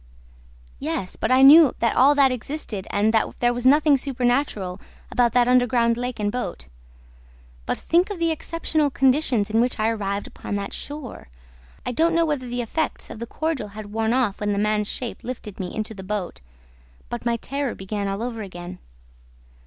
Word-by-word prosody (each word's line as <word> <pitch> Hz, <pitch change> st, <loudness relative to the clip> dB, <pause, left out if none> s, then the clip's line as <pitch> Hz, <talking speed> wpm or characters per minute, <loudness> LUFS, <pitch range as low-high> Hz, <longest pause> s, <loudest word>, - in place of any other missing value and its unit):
"Yes, 180 Hz, +3 st, -3 dB
but -, -, -2 dB
I 260 Hz, +1 st, +6 dB
knew 295 Hz, 0 st, +8 dB
that 230 Hz, -1 st, +1 dB
all 280 Hz, +3 st, +5 dB
that 275 Hz, -2 st, +5 dB
existed 245 Hz, -5 st, -5 dB
and 210 Hz, +2 st, +1 dB
that 220 Hz, -, 0 dB
there 240 Hz, 0 st, +2 dB
was 245 Hz, +1 st, 0 dB
nothing 295 Hz, +1 st, +5 dB
supernatural 245 Hz, -8 st, -1 dB, 0.3 s
about 240 Hz, -2 st, +2 dB
that 245 Hz, -1 st, +4 dB
underground 245 Hz, -2 st, +3 dB
lake 245 Hz, 0 st, -4 dB
and 205 Hz, -1 st, 0 dB
boat. 250 Hz, +2 st, -4 dB, 1.0 s
But -, -, -1 dB
think 350 Hz, +4 st, +2 dB
of 405 Hz, -, -4 dB
the 335 Hz, -1 st, +1 dB
exceptional 315 Hz, -1 st, -1 dB
conditions 260 Hz, -6 st, +2 dB
in 225 Hz, +1 st, +3 dB
which 245 Hz, -1 st, -1 dB
I 215 Hz, +1 st, +2 dB
arrived 205 Hz, -2 st, -2 dB
upon -, -, -6 dB
that 200 Hz, 0 st, -4 dB
shore! 290 Hz, -3 st, -7 dB, 0.6 s
I -, -, -1 dB
don't 330 Hz, +6 st, +2 dB
know 335 Hz, 0 st, +3 dB
whether 290 Hz, -5 st, -2 dB
the 245 Hz, 0 st, -2 dB
effects 315 Hz, +7 st, -3 dB
of -, -, -8 dB
the 235 Hz, -, -5 dB
cordial 315 Hz, -2 st, -2 dB
had 210 Hz, -1 st, -8 dB
worn 225 Hz, 0 st, 0 dB
off 240 Hz, -5 st, +1 dB
when 205 Hz, 0 st, 0 dB
the -, -, -2 dB
man's 210 Hz, 0 st, +1 dB
shape 245 Hz, -3 st, -5 dB
lifted 230 Hz, -5 st, -7 dB
me 185 Hz, -, -3 dB
into 220 Hz, +1 st, -4 dB
the 195 Hz, -, -9 dB
boat, 190 Hz, -1 st, -4 dB, 0.7 s
but 240 Hz, -, -5 dB
my 235 Hz, 0 st, 0 dB
terror 275 Hz, +2 st, -3 dB
began 200 Hz, +1 st, -4 dB
all 195 Hz, +3 st, -3 dB
over 235 Hz, -2 st, -4 dB
again. 180 Hz, -2 st, -8 dB
240 Hz, 185 wpm, -23 LUFS, 210-275 Hz, 1.0 s, knew